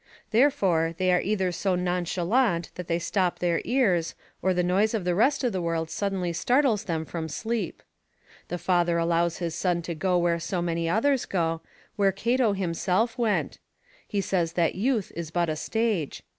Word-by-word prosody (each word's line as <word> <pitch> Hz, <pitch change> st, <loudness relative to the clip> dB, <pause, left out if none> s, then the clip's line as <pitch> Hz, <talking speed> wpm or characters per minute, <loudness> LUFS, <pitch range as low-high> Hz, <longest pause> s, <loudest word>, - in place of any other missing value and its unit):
Therefore, 190 Hz, -, +2 dB
they 185 Hz, 0 st, +2 dB
are 180 Hz, -, +3 dB
either 190 Hz, -2 st, 0 dB
so 185 Hz, +1 st, 0 dB
nonchalant 180 Hz, +2 st, 0 dB
that 180 Hz, -2 st, -7 dB
they 170 Hz, -, +1 dB
stop 180 Hz, +1 st, 0 dB
their 175 Hz, -1 st, 0 dB
ears, 195 Hz, -11 st, +1 dB, 0.3 s
or 190 Hz, -, +2 dB
the 180 Hz, -1 st, +1 dB
noise 200 Hz, +5 st, +2 dB
of 210 Hz, -, -2 dB
the 180 Hz, 0 st, +1 dB
rest 265 Hz, +10 st, +2 dB
of 245 Hz, -4 st, +1 dB
the 185 Hz, -, -1 dB
world 165 Hz, -1 st, -2 dB
suddenly 185 Hz, -1 st, -2 dB
startles 245 Hz, -, +2 dB
them 160 Hz, -3 st, -2 dB
from 160 Hz, 0 st, -5 dB
sleep. 220 Hz, +5 st, -3 dB, 0.6 s
The 175 Hz, -, -3 dB
father 175 Hz, -1 st, +1 dB
allows 170 Hz, 0 st, +1 dB
his 170 Hz, -2 st, -3 dB
son 175 Hz, -1 st, 0 dB
to 170 Hz, -, -4 dB
go 180 Hz, +3 st, +1 dB
where 170 Hz, -1 st, +1 dB
so 170 Hz, +2 st, -2 dB
many 170 Hz, -1 st, -1 dB
others 255 Hz, +8 st, +2 dB
go, 165 Hz, -3 st, -1 dB, 0.4 s
where 200 Hz, -1 st, +4 dB
Cato 230 Hz, +3 st, +1 dB
himself 190 Hz, +4 st, 0 dB
went; 225 Hz, -3 st, 0 dB, 0.5 s
he 205 Hz, -, -1 dB
says 175 Hz, -4 st, 0 dB
that 170 Hz, -2 st, +1 dB
youth 220 Hz, 0 st, 0 dB
is 170 Hz, -2 st, -5 dB
but 170 Hz, 0 st, 0 dB
a 155 Hz, -, -1 dB
stage. 215 Hz, -3 st, -1 dB
180 Hz, 180 wpm, -26 LUFS, 170-210 Hz, 0.6 s, where